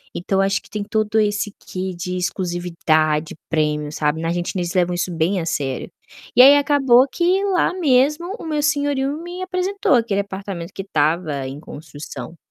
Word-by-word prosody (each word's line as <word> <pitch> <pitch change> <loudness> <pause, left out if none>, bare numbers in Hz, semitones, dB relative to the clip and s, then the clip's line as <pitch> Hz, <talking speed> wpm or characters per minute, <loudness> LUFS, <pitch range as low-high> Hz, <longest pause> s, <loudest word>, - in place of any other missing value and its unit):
Então 190 +2 0
acho 195 +1 +1
que - - -19
tem 210 -1 -3
todo 215 +1 0
esse 205 -1 0
quê 185 0 -4
de 180 +1 -4
exclusividade, 170 -4 0
premium, 150 -2 0
sabe. 150 +1 -1
Na 165 - -1
a - - +1
gente 175 +2 -3
eles 175 -1 -2
levam 180 -1 +1
isso 180 +1 -2
bem 175 +4 +1
a 165 - -3
sério. 135 -5 -2 0.5
E 245 - +8
aí 280 +3 +9
acabou 270 -3 +4
que 360 +7 +1
lá 375 -3 +2
mesmo 300 +2 +2
o - - -8
meu 305 -2 -1
senhorio 285 -1 0
me 350 +2 -6
apresentou 370 0 0
aquele 230 -5 +2
apartamento 195 -3 -7
que - - -5
estava 155 -4 0
em 135 +2 -7
construção. 150 +2 -9
195 Hz, 180 wpm, -21 LUFS, 165-280 Hz, 0.5 s, aí